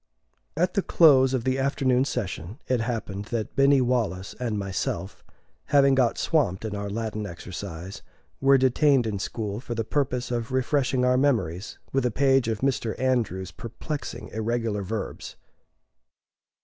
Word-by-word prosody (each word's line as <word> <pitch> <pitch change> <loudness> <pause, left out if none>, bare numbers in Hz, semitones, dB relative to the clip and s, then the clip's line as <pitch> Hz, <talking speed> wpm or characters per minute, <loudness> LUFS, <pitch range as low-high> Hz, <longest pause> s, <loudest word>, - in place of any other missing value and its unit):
At 180 +2 +1
the 200 - +2
close 135 -8 +5
of 125 - -2
the 130 +1 0
afternoon 135 -1 +2
session 100 - -4
it 125 -2 +1
happened 110 -4 -3
that 115 -1 -4
Binny 140 0 +5
Wallace 110 -7 -1
and 115 -4 -2
myself, 95 -1 -3 0.4
having 140 -1 +4
got 130 -3 +2
swamped 125 - +1
in 105 -1 -3
our 100 0 -4
Latin 110 0 -3
exercise, 85 0 -7 0.4
were 135 0 +5
detained 130 0 +3
in 105 -3 -2
school 105 +1 -4
for 120 -1 -5
the 115 - -1
purpose 125 0 -1
of 120 +1 -2
refreshing 130 0 +1
our 125 0 +3
memories 105 - 0 0.2
with 135 -1 +2
a 125 - +2
page 135 +1 +3
of 110 -2 -2
Mr. 125 -4 -1
Andrews's 115 -9 0
perplexing 140 - -6
irregular 110 -1 -2
verbs. 100 +1 -5
120 Hz, 150 wpm, -26 LUFS, 105-135 Hz, 0.4 s, close